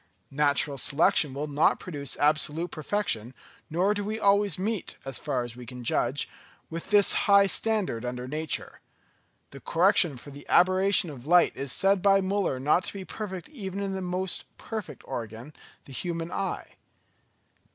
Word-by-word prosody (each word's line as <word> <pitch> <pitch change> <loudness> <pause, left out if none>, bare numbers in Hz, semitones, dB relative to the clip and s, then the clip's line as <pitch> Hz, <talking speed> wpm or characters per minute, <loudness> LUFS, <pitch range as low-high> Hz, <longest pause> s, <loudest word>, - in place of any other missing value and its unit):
Natural 145 0 +1
selection 145 +1 +3
will 145 +2 -2
not 150 +1 +2
produce 145 -6 -5
absolute 155 +3 +1
perfection, 145 - -2 0.3
nor 180 +6 +2
do 205 -1 -3
we 215 +2 -3
always 200 -4 +3
meet, 205 +1 -3
as 135 -2 -3
far 125 -2 -2
as 120 -1 -7
we 125 - -10
can 125 +1 -9
judge, - - 0 0.4
with 165 +1 -6
this 205 -2 +5 0.2
high 200 0 +7
standard 200 - 0
under 125 0 -4
nature. 155 +3 -3 0.7
The 140 - -10
correction 170 -2 +3
for 145 +4 -11
the 140 +1 -12
aberration 185 -1 +4
of 135 -1 -11
light 175 +1 +5
is 135 -1 -4
said 195 0 +2
by 195 0 +5
Müller 195 -8 -1
not 150 +6 +2
to - - -4
be 195 -2 -7
perfect 190 -5 -6
even 200 -9 -6
in 200 -1 -2
that 190 - -3
most 180 0 -1
perfect 220 -4 -7
organ, 115 +5 -7 0.3
the 135 - -12
human 170 +3 -4
eye. 195 - -4
170 Hz, 160 wpm, -27 LUFS, 140-195 Hz, 0.7 s, high